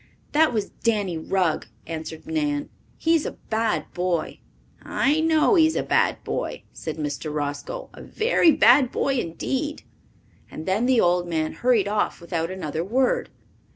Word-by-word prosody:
"That 310 0 +4
was 215 -4 -2
Danny 205 -6 +1
Rugg," 165 0 0 0.2
answered 160 +1 -6
Nan. 295 -2 -1 0.3
"He 325 - +2
is 325 -2 +3
a - - -5 0.2
bad 220 0 0
boy." 175 -2 -2 0.4
"I 290 +4 +1
know 320 +5 +3
he 325 -5 +6
is 320 - -2
a - - 0
bad - - +1
boy," - - -4
said 160 -1 -6
Mr. 150 0 -3
Roscoe. 150 - -4
"A - - -11
very 440 -7 +3
bad 255 -1 +5
boy 275 -2 0
indeed." 265 - -3 0.7
And 155 - -8
then 205 +6 +1
the 255 -2 +4
old 175 -1 +2
man 160 -2 -1
hurried 240 -5 +2
off 210 0 0
without 170 -1 -3
another 165 -4 -3
word. 250 +7 +1
215 Hz, 155 wpm, -24 LUFS, -, 0.7 s, he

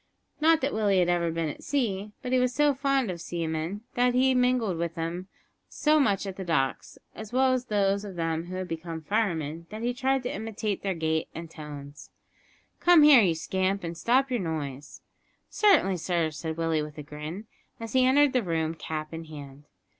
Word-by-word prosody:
Not 320 +1 +4
that 275 +2 -1
Willie 205 -3 +2
had 175 -1 +3
ever 175 -1 +1
been 165 0 -1
at 150 - -6
sea, 210 -7 -1
but 250 - -4
he 255 - +4
was 250 -1 +1
so 295 0 +4
fond 275 -5 0
of 170 -2 -7
seamen, 165 +3 -3
and 245 0 +2
had 260 +1 +4
mingled 250 -7 +2
with 170 -1 -2
them 170 +3 -4 0.4
so 305 0 +2
much 205 -8 +2
at 195 -1 -6
the 190 - -4
docks, 150 -7 -1 0.2
as 215 -1 -9
well 260 +1 +3
as 250 -1 -1
those 200 -2 +1
of 200 -3 -8
them 165 -1 -2
who 180 +1 -7
had 185 0 -4
become 165 -1 -6
firemen, 165 -5 -1
that 215 +2 -7
he 245 +1 0
tried 265 +1 0
to 245 - -3
imitate 215 -1 -3
their 195 -2 -2
gait 160 -1 -1
and 165 0 -7
tones. 145 -2 -10 0.7
"Come 350 -3 +6
here, 290 -5 +9
you 175 -5 +2
scamp, 190 +4 -1
and 170 0 -4
stop 255 +9 +2
your 245 - +1
noise." 145 -5 -5 0.5
"Certainly, 380 - +4
sir," 170 -2 0
said 160 +1 -5
Willie, 165 -2 0
with 150 0 -7
a 150 - -6
grin, 150 +8 -7 0.3
as 225 -1 -7
he 260 -1 +4
entered 275 +2 +4
the 250 - +3
room, 165 -4 -1
cap 155 -1 -5
in 165 0 -6
hand. 145 -2 -11
185 Hz, 200 wpm, -27 LUFS, 160-245 Hz, 0.7 s, here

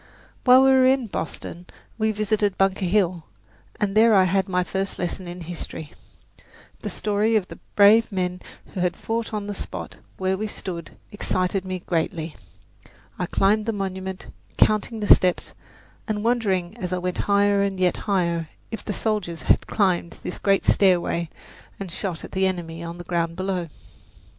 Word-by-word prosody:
While 255 +1 +8
we 270 - +6
were 260 -1 +6
in 260 -1 +3
Boston 175 -2 -6 0.3
we 220 0 +2
visited 210 -1 0
Bunker 195 0 +2
Hill, 180 -3 +1 0.5
and 205 -1 0
there 220 0 +6
I 190 - +6
had 190 +1 +1
my 180 0 +1
first 195 +2 -3
lesson 180 +1 -4
in 175 +1 -7
history. 160 -2 -6 0.9
The - - -4
story 210 +2 0
of 200 -4 +1
the - - -10 0.2
brave 215 +3 +6
men 180 -1 -2 0.3
who - - -4
had 180 -1 +1
fought 225 0 -3
on 210 -2 -3
the 205 - -4
spot - - -6 0.2
where 190 0 0
we 215 - -1
stood 175 -5 -7
excited 190 -2 -1
me 185 -1 -4
greatly. 165 -1 -2 0.8
I 180 - -1
climbed 210 +4 +2
the 225 - +1
monument, 190 -1 -4 0.3
counting 215 +1 +2
the 205 - +8
steps, 180 -1 -1 0.5
and 210 -2 -2
wondering 210 -6 0
as 180 -4 -4
I 185 - 0
went 180 0 -3
higher 200 0 +4
and 195 -1 -1
yet 180 -1 +2
higher 170 -5 0 0.2
if 225 - -5
the 205 - -3
soldiers 200 -8 -2
had - - +3
climbed 180 -5 0
this - - -5
great 195 -1 +2
stairway 175 -3 +3 0.5
and 195 -3 -6
shot 180 -2 -4
at - - -9
the 190 0 +2
enemy 170 -3 -4
on 170 0 -6
the 175 - -7
ground 170 -1 -1
below. 185 -2 -2
190 Hz, 170 wpm, -24 LUFS, 180-210 Hz, 0.9 s, While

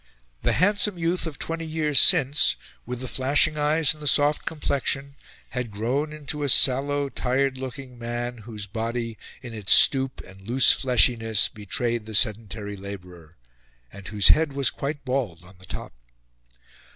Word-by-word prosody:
The - - +1
handsome 205 0 +2
youth 170 +1 -1
of 155 - -7
twenty 165 0 -5
years 155 -2 +2
since 155 -3 +4 0.3
with 125 0 -6
the 130 - -5
flashing 145 +5 +1
eyes 150 +1 +2
and 150 - -17
the 150 - -5
soft 145 +1 +2
complexion 140 -2 -2 0.4
had 125 -2 -4
grown 125 +9 -2
into 150 0 -5
a 145 - -1
sallow, 140 +2 +3
tired 130 0 -1
looking 130 -1 -8
man, 120 +1 -4
whose 105 -2 -8
body, 115 +2 -4 0.3
in 120 -2 -8
its 105 -4 +2
stoop 135 -1 +5
and 95 +1 -15
its 100 - -13
loose 130 +2 +5
fleshiness, 115 -4 +2
betrayed 110 +2 -3
the 110 - -2
sedentary 105 -2 0
labourer, 90 -4 -11 0.6
and 100 -2 -11
whose 105 -2 +3
head 155 -2 +3
was 140 -1 +1
quite 140 0 -5
bald 120 -11 -3
on 90 +1 -18
the 95 - -16
top. - - -8
130 Hz, 160 wpm, -24 LUFS, 110-145 Hz, 0.6 s, stoop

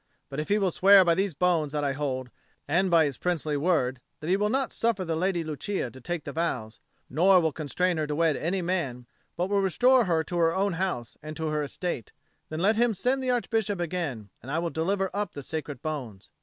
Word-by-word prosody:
But 140 +1 -5
if 150 - -4
he 205 - +4
will 195 -3 +1
swear 195 +2 +7
by 170 - +4
these 190 -1 0
bones 165 -4 +1
that 150 -1 -1
I 140 -1 +1
hold, 130 -3 -3 0.4
and 180 +6 +2
by 165 -2 +5
his 140 -5 -3
princely 160 -4 -1
word, 140 -5 +1 0.2
that 155 - -5
he - - +5
will 210 +1 +1
not 265 +1 0
suffer 225 -5 0
the 165 -1 -1
Lady 175 0 0
Lucia 155 -2 -3
to 130 - -12
take 175 +2 -3
the - - -6
vows, 125 -10 -3 0.3
nor 185 +7 +5
will 160 -2 +1
constrain 165 +4 -1
her 155 -1 -1
to 150 - -2
wed 160 -1 +2
any 180 +3 -1
man, 150 -9 -2 0.3
but 180 - 0
will 200 0 +2
restore 245 +6 +4
her 165 -3 +1
to 175 +1 -3
her 165 0 +3
own 195 0 +1
house 165 -10 -3
and 155 +1 -7
to 160 -1 -2
her 150 0 0
estate, 145 - -4 0.4
then 155 +1 -4
let 210 +4 +3
him 235 -2 +3
send 255 +7 0
the 260 - -2
Archbishop 225 -5 0
again, 155 - -3
and 125 - -10
I 155 - -1
will 170 0 -1
deliver 190 +4 0
up 205 -1 -2
the 140 - -7
sacred 145 -3 -5
bones. 130 -11 -5
170 Hz, 230 wpm, -27 LUFS, 150-190 Hz, 0.4 s, swear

